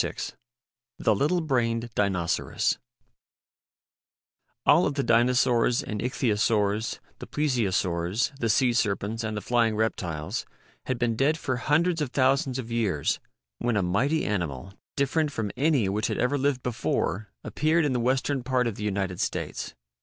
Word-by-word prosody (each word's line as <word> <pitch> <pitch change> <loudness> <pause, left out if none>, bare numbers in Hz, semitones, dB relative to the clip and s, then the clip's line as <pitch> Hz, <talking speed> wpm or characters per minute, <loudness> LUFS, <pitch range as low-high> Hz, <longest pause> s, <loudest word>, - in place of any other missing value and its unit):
"Sa^R^E - - -4 0.6
THE 110 - +2
LITTLE 165 - +1
BRAINED 120 -5 0
DINOCERAS 95 -5 0 1.9
ALL - - +5
of 145 - -3
the 140 - 0
Dinosaurs 120 0 +3
and 105 -1 -4
Ichthyosaurs, 110 -3 +1 0.2
the - - -8
Plesiosaurs, 100 - 0
the 115 - 0
sea 120 +3 +3
serpents, 110 0 -1
and 110 -1 -3
the - - -3
flying 115 0 +2
reptiles, 85 -8 -2 0.4
had 130 - 0
been 120 -1 0
dead 145 +6 +2
for 130 -6 -2
hundreds 160 +5 +1
of 145 - -1
thousands 130 0 +2
of 120 -3 -6
years 105 -11 0 0.4
when 120 -3 0
a 100 - +2
mighty 135 - +1
animal 85 -3 -3 0.2
different 145 +2 +1
from 110 -6 -3
any 140 -5 +2
which 105 +2 0
had - - -2
ever 125 +3 +1
lived 140 -2 0
before 110 -3 -1
appeared 155 +2 +1
in 140 - +1
the 125 - 0
western 130 +3 +1
part 125 0 +1
of 115 -4 -2
the 105 - -5
United 95 -3 -2
States. - - -3
120 Hz, 150 wpm, -26 LUFS, 105-135 Hz, 1.9 s, ALL